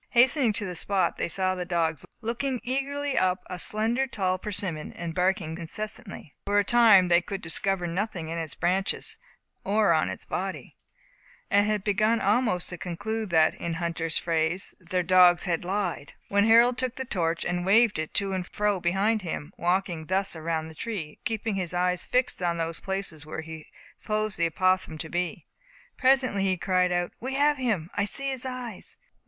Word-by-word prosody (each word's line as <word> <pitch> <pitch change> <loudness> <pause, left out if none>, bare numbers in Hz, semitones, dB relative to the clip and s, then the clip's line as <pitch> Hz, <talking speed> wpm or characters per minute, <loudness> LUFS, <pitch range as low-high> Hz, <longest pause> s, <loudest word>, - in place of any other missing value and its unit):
Hastening 255 0 +4
to 205 0 -2
the 180 - -4
spot, 195 +1 0
they - - -1
saw 185 +1 0
the 180 -1 -3
dogs 165 -4 -1
looking 245 +3 -2
eagerly 275 +2 -2
up 185 0 +1
a 180 - -6
slender, 225 +8 +1
tall 185 -5 -1
persimmon, 185 -6 -3
and 170 -1 -5
barking 180 -2 0
incessantly. 210 - -6
For 205 0 +2
a 205 - +5
time 215 -4 +6
they 175 0 +4
could 195 +2 -5
discover 180 +2 0
nothing 175 -1 -3
in 165 +1 -3
its 160 -2 -5
branches, 185 +3 0 0.4
or 205 -2 +3
on 155 - +1
its - - -6
body; 190 +1 -4 0.8
and 205 +1 +4
had 210 -2 0
begun 215 +3 +2
almost 205 -3 +1
to 180 - -7
conclude 215 +5 -3
that 160 -2 +4
(in 170 -1 -4
hunter's 165 -1 -2
phrase) 165 +2 0
their 180 0 -2
dogs 180 0 +6
had 175 -3 -1
lied, 180 -6 -2 0.2
when 200 +1 +3
Harold 235 +2 +5
took 255 -1 -1
the 265 - -4
torch, 170 -7 -1
waved 195 +4 +3
it 155 - -5
to 195 -1 +1
and 185 -1 -3
fro 210 -2 0
behind 195 +6 +1
him, 170 -1 -5
walking 175 -3 -1
thus 190 0 +1
around 160 0 -2
the 160 - -10
tree, 180 -2 -5
and - - -22
keeping 225 -1 -2
his 185 -2 -2
eyes 180 0 +1
fixed 250 -5 0
on 170 -1 0
those 165 0 -3
places 190 -6 -3
where 155 +1 -6
he 160 -1 -9 0.3
supposed 215 -2 -2
the 170 - +3
opossum 185 -1 +1
to 160 - -6
be. 175 +1 -3 0.5
Presently 255 -6 +3
he 190 -1 +1
cried 185 0 +1
out, 175 0 0
"We 265 +2 -4
have 290 +1 +3
him! 210 -10 -1
I 205 - +1
see 275 +6 -2
his 260 0 -3
eyes! 250 -5 -6
185 Hz, 180 wpm, -27 LUFS, 170-215 Hz, 0.8 s, time